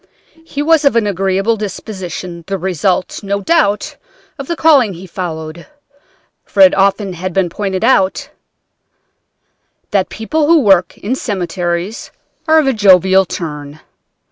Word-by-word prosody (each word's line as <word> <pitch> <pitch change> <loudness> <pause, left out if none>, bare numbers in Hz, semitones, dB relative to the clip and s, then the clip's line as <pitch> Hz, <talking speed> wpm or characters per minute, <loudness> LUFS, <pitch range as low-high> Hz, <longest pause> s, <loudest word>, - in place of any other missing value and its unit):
He 290 -3 -4
was 320 0 +3
of 280 -4 +3
an 230 -2 +2
agreeable 195 +2 0
disposition, 185 -4 -7
the 195 0 -2
result, 185 0 -1
no 200 -1 -2
doubt, 205 - 0 0.4
of 275 - -6
the 340 - -2
calling 285 -11 +3
he 180 +3 -10
followed, 165 -2 -6 0.8
for 200 - -1
it 190 -1 +7
has 195 - +2
often 195 0 0 0.2
been 190 -1 +1
pointed 195 +1 -3
out 210 -6 +1 1.6
that 195 -2 +1
people 295 +8 -2
who 330 -1 +5
work 190 -6 +3
in 215 +6 -3
cemeteries 180 -3 -3 0.4
are 315 0 +5
of 310 - +3
a 270 - +2
jovial 190 -2 +4
turn. 150 -4 -7
195 Hz, 140 wpm, -15 LUFS, 180-225 Hz, 1.6 s, it